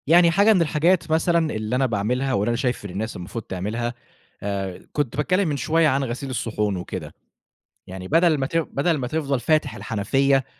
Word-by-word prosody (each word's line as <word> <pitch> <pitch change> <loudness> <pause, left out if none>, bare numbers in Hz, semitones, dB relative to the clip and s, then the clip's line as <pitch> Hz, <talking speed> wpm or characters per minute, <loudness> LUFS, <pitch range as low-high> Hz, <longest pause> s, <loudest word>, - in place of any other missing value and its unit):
يعني 170 +2 +6
حاجة 200 +5 +5
من 185 - +3
الحاجات 165 +2 +2
مثلًا 165 0 +2
اللي 110 +3 -2
أنا 135 +1 +2
باعملها، 125 +4 0
واللي 105 0 +1
أنا 120 - 0
شايف 125 -4 -1
ان - - -5
الناس 105 +5 -4
المفروض 95 +6 -6
تعملها، 110 +7 -3 1.0
كنت 145 -4 -1
باتكلِّم 185 +5 +1
من 145 - -1
شوية 165 +2 +2
عن 135 -1 +1
غسيل 130 +2 -4
الصحون 105 -5 -1
وكده، 90 - -6 0.7
يعني 95 0 -7
بدل 165 - +4
ما 135 - -1
ت 165 - -1
بدل 160 0 0
ما 125 -3 -3
تفضل 140 -2 -1
فاتح 155 +4 +1
الحنفية، 135 +5 +1
135 Hz, 180 wpm, -23 LUFS, 115-160 Hz, 1.0 s, يعني